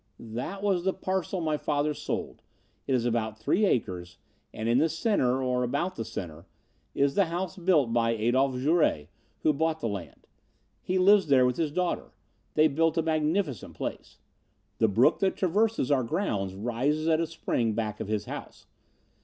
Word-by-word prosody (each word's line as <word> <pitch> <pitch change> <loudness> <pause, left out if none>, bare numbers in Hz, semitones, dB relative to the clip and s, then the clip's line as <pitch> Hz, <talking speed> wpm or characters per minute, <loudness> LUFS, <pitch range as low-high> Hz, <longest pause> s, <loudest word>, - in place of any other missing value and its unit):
"That 175 - -4
was 190 -4 +1
the 190 0 +1
parcel 190 -1 -2
my 155 -2 0
father 150 0 0
sold. - - -5 0.5
It 135 - +2
is 120 -2 0
about 110 -2 -1
three 180 - +1
acres, 90 - -2 0.3
and 110 - -4
in 120 +2 +4
the 160 +2 +3
center, 145 - +1
or 125 -1 0
about 145 +9 -1
the 115 - -3
center, 90 -6 -7 0.5
is 140 0 +2
the 200 - +3
house 175 +1 -3
built 170 -10 +2
by 115 -1 +2
Adolph 125 +4 +1
Jouret, 130 - +1 0.3
who 155 - +4
bought 160 +2 0
the 130 - -2
land. 100 -5 -7 0.6
He 185 - -1
lives 195 0 +5
there 130 -3 +5
with 125 0 0
his 160 -3 0
daughter. 180 +3 -2 0.4
They 155 +1 +6
built 165 +2 +1
a 165 - +2
magnificent 155 - -1
place. - - -6 0.6
The 110 - +4
brook 110 +5 +3
that 195 -1 +1
traverses 200 - +1
our 135 -3 +3
grounds 100 - -2
rises 125 +9 -1
at 160 -1 +3
a 165 - -1
spring 115 -7 -1
back 105 -2 -3
of 110 - -4
his 105 -1 -2
house. - - -8
140 Hz, 175 wpm, -28 LUFS, 115-170 Hz, 0.6 s, They